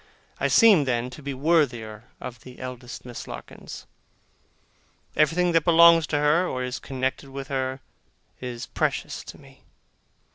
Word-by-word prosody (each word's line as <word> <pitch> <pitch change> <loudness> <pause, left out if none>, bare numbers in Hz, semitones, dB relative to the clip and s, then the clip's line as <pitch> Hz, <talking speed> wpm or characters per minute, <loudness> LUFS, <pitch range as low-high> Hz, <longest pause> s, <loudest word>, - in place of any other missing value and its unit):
I - - +2
seem, 205 - +6
then, 125 -1 -1
to 150 - -10
be 140 -1 -5
worthier 125 -8 0
of 120 -2 -8
the 125 +2 -13
eldest 125 -1 -8
Miss 120 -1 -8
Larkins. - - -9 1.3
Everything 170 +4 +3
that 165 -2 +3
belongs 170 -1 +6
to 150 - 0
her, 150 +5 +3
or 130 -5 -3
is 125 +1 -4
connected 130 +1 -3
with 135 0 -7
her, 130 -1 -2 0.6
is 125 -2 -6
precious - - -2
to - - -10
me. - - -18
135 Hz, 145 wpm, -25 LUFS, 125-160 Hz, 1.3 s, seem